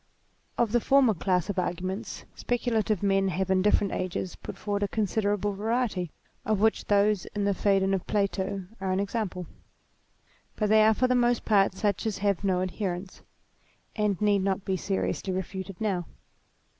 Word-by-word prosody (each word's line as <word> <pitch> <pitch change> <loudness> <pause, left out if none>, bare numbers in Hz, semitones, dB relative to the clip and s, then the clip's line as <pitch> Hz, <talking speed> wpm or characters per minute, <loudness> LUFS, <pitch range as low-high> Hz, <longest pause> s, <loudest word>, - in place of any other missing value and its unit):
Of 235 -3 +2
the 240 - +3
former 265 -1 +4
class 180 -1 0
of 200 -2 -1
arguments 185 +4 -4
speculative 225 -5 -1
men 195 -1 +2
have 190 0 -1
in 190 0 +3
different 205 0 +2
ages 185 0 -3
put - - -9
forward 205 -1 -2
a 205 - +1
considerable 205 -1 0
variety, 215 -3 -1 0.3
of 215 -2 0
which 220 +1 +2
those 205 -1 +2
in 205 - 0
the 200 0 +2
Phsedon 195 0 +2
of 190 - -2
Plato 195 -1 -1
are 190 -1 -2
an 185 - +1
example; 200 -3 -2 1.1
but 210 -2 0
they 215 0 +6
are 220 0 +5
for 255 - +2
the 255 - +2
most 245 -1 +2
part 195 -3 +3
such 205 +1 0
as 210 - -2
have 200 -1 0
no 185 -2 +1
adherents, 185 0 -4 0.7
and 210 -4 0
need 205 -1 +3
not 195 0 -1
be 190 - 0
seriously 190 +1 -2
refuted, 190 0 -5
now. 190 -6 -1
200 Hz, 170 wpm, -27 LUFS, 190-215 Hz, 1.1 s, they